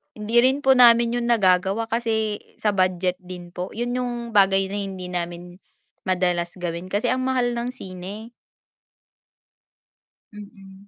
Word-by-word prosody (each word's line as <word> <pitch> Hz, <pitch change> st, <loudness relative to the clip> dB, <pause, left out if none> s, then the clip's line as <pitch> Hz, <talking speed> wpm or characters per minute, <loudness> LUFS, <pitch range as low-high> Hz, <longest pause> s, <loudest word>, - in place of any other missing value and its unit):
Hindi 225 Hz, +3 st, +2 dB
rin 265 Hz, +2 st, +3 dB
po 265 Hz, -2 st, +4 dB
namin 235 Hz, -1 st, +6 dB
yung 240 Hz, -1 st, -1 dB
nagagawa 195 Hz, +1 st, +2 dB
kasi 220 Hz, -2 st, -1 dB, 0.2 s
sa 210 Hz, -2 st, +1 dB
budget 185 Hz, -1 st, +1 dB
din 180 Hz, -1 st, -9 dB
po 180 Hz, +1 st, -5 dB
yun 240 Hz, +2 st, -3 dB
yung 250 Hz, -1 st, -2 dB, 0.2 s
bagay 195 Hz, -1 st, +4 dB
na 200 Hz, -, -6 dB
hindi 195 Hz, -2 st, -5 dB
namin 175 Hz, 0 st, -5 dB, 0.5 s
madalas 180 Hz, -1 st, 0 dB
gawin 175 Hz, +1 st, -5 dB
kasi 205 Hz, +4 st, 0 dB
ang 255 Hz, +2 st, 0 dB
mahal 250 Hz, -2 st, 0 dB
ng 235 Hz, +1 st, -3 dB
sine. 205 Hz, 0 st, -8 dB, 2.0 s
Mm, 200 Hz, -1 st, -14 dB
200 Hz, 140 wpm, -23 LUFS, 185-235 Hz, 2.0 s, namin